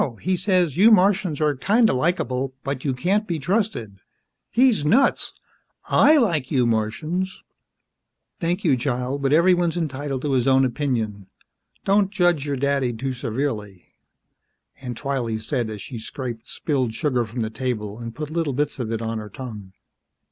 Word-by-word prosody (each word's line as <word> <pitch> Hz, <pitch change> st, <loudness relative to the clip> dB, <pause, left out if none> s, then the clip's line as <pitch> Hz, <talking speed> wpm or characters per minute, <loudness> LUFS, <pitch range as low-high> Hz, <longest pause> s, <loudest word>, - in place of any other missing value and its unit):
He 185 Hz, 0 st, +1 dB
says, 180 Hz, -4 st, +1 dB
you 210 Hz, +5 st, +7 dB
Martians 190 Hz, -6 st, +3 dB
are 150 Hz, -1 st, +3 dB
kinda 220 Hz, -, +3 dB
likeable, 130 Hz, -3 st, -1 dB
but 140 Hz, -2 st, -3 dB
you 140 Hz, -, 0 dB
can't 200 Hz, -, 0 dB
be 170 Hz, -3 st, -1 dB
trusted. 155 Hz, -, -1 dB, 0.5 s
He's 240 Hz, -, +3 dB
nuts! 230 Hz, -, +3 dB, 0.5 s
I 305 Hz, +2 st, +5 dB
like 165 Hz, -, +1 dB
you 130 Hz, -4 st, +2 dB
Martians!" 155 Hz, -, -1 dB, 1.0 s
"Thank 175 Hz, +3 st, -1 dB
you, 150 Hz, -7 st, +4 dB
child, 125 Hz, +2 st, -2 dB
but 135 Hz, 0 st, +1 dB
everyone's 175 Hz, +1 st, +3 dB
entitled 145 Hz, -4 st, -3 dB
to 145 Hz, -, -1 dB
his 130 Hz, -2 st, +2 dB
own 135 Hz, 0 st, +5 dB
opinion. 115 Hz, -7 st, -2 dB, 0.6 s
Don't 195 Hz, 0 st, +3 dB
judge 175 Hz, -7 st, +1 dB
your 140 Hz, -1 st, -1 dB
daddy 140 Hz, -2 st, +1 dB
too 130 Hz, +3 st, -3 dB
severely," 115 Hz, -6 st, -4 dB, 0.9 s
Aunt 125 Hz, -3 st, -6 dB
Twylee 130 Hz, -6 st, -2 dB
said 120 Hz, 0 st, -2 dB
as 105 Hz, -3 st, -6 dB
she 120 Hz, -4 st, -7 dB
scraped 120 Hz, 0 st, -6 dB
spilled 130 Hz, -7 st, -1 dB
sugar 130 Hz, -5 st, +1 dB
from 115 Hz, +2 st, -5 dB
the 110 Hz, 0 st, -2 dB
table 110 Hz, -3 st, -3 dB
and 115 Hz, -1 st, -7 dB
put 150 Hz, 0 st, -5 dB
little 165 Hz, -4 st, -1 dB
bits 145 Hz, +1 st, -1 dB
of 115 Hz, -3 st, -3 dB
it 115 Hz, 0 st, -2 dB
on 115 Hz, 0 st, -2 dB
her 105 Hz, -1 st, -8 dB
tongue. 105 Hz, -5 st, -8 dB
135 Hz, 160 wpm, -23 LUFS, 120-175 Hz, 1.0 s, you